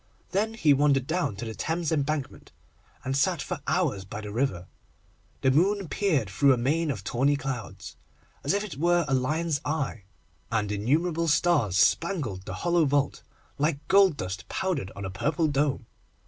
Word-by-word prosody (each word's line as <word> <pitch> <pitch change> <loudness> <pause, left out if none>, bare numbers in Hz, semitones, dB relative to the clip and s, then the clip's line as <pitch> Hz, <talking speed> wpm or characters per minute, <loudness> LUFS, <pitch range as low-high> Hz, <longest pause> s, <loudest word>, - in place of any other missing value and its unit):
Then 220 +3 0
he 155 -10 +4
wandered 140 -2 +3
down 160 - -1
to 100 - -6
the 110 - -5
Thames 165 +5 -2
Embankment, 145 -2 -2 0.5
and 130 +1 -2
sat 140 - +2
for - - -4
hours 95 -2 0
by 100 +3 -7
the 105 -1 -7
river. 105 -7 -1 0.8
The 130 - +3
moon 190 +6 +2
peered 160 - +1
through 135 +8 +4
a - - 0
mane 150 +7 0
of 110 -9 -3
tawny 135 +7 +1
clouds, 120 -8 -6 0.5
as 145 - +1
if 205 - 0
it 200 -10 -7
were 175 +2 +2
a 135 - 0
lion's 150 +4 0
eye, 145 -9 -3 0.5
and 105 -2 0
innumerable 160 - 0
stars 145 - +2
spangled 110 - +1
the - - -5
hollow 170 -2 +3
vault, 140 0 0 0.4
like 145 -1 -1
gold 195 -5 +5
dust 95 +1 -5
powdered 160 - -2
on 100 - -6
a 95 - -4
purple 150 - 0
dome. 140 -4 0
140 Hz, 170 wpm, -27 LUFS, 115-165 Hz, 0.8 s, gold